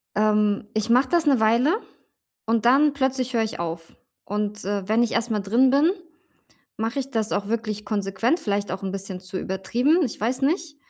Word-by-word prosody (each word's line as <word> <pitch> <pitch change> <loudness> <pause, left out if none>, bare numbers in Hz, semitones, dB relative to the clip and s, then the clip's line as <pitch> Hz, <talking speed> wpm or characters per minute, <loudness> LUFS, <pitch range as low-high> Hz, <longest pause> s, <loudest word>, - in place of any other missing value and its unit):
Ähm, 210 -1 +2
ich 215 +1 -1
mache 255 +3 +4
das 340 -2 +2
'ne 275 -4 +4
Weile 235 - +3 0.7
und 225 0 0
dann 280 +4 +5
plötzlich 260 -2 -1
höre 230 -2 +2
ich 220 - -5
auf. 165 -1 -5 0.3
Und, 210 0 -3
äh, 200 -1 -2
wenn 220 +3 +3
ich 235 - -1
erst 230 +1 -1
mal 215 - +1
drin 230 +7 +3
bin, 290 +5 +4 0.9
mache 225 +4 -2
ich 270 0 -6
das 225 -4 -1
auch 200 0 -1
wirklich 215 -2 -3
konsequent, 205 - 0
vielleicht 205 -5 -2
auch 190 - -5
'n 190 -1 -3
bisschen 195 -1 -6
zu 185 0 -6
übertrieben, 240 - +1
ich 245 - -5
weiß 245 +5 -1
nicht. 305 +1 0
220 Hz, 195 wpm, -24 LUFS, 205-260 Hz, 0.9 s, dann